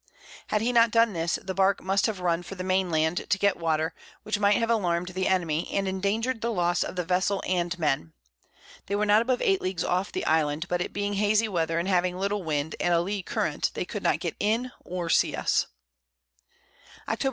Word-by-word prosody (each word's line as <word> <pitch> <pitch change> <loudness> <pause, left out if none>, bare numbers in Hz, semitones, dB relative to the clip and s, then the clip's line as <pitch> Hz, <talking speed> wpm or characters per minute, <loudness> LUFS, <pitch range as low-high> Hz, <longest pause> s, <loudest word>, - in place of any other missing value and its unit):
Had 210 - 0
he 245 +2 +1
not 230 -1 +5
done 230 -1 +3
this, 165 -1 -1
the 190 - -4
Bark 195 +1 +2
must 195 +3 +2
have 205 -4 -4
run 170 -1 +1
for 175 +2 -9
the 185 - -5
Main 185 0 +1
Land 160 +2 0
to 195 - +3
get 200 0 +2
Water, 160 -1 0 0.3
which 215 -1 -2
might 205 0 +4
have 230 0 0
alarm'd 180 -5 0
the 185 +1 -2
Enemy, 170 -4 0
and 195 -1 0
endanger'd 215 +6 -1
the 235 - -1
Loss 175 -4 +1
of - - -6
the 180 - -1
Vessel 185 +3 0
and 180 -1 -1
Men. 135 - -1 0.7
They 200 - -1
were 210 +1 +1
not 210 +1 +5
above 245 +1 0
8 195 -1 +2
Leagues 185 -2 -2
off 185 +3 -1
the - - -3
Island, 155 +1 +1
but 175 0 -1
it - - -3
being 205 0 -2
hazey 210 +2 +3
Weather, 165 -4 -1
and 170 +2 -1
having 180 -1 +1
little 200 +2 -1
Wind, 155 -2 -2
and 175 -1 +2
a - - +4
Lee 195 +3 -2
Current, - - -1
they - - -2
could - - -5
not - - +1
get - - -3
in, 230 +5 0
or 175 -1 -4
see - - +2
us. - - +1 1.4
_Octob. 225 - -2
185 Hz, 220 wpm, -27 LUFS, 175-205 Hz, 1.4 s, not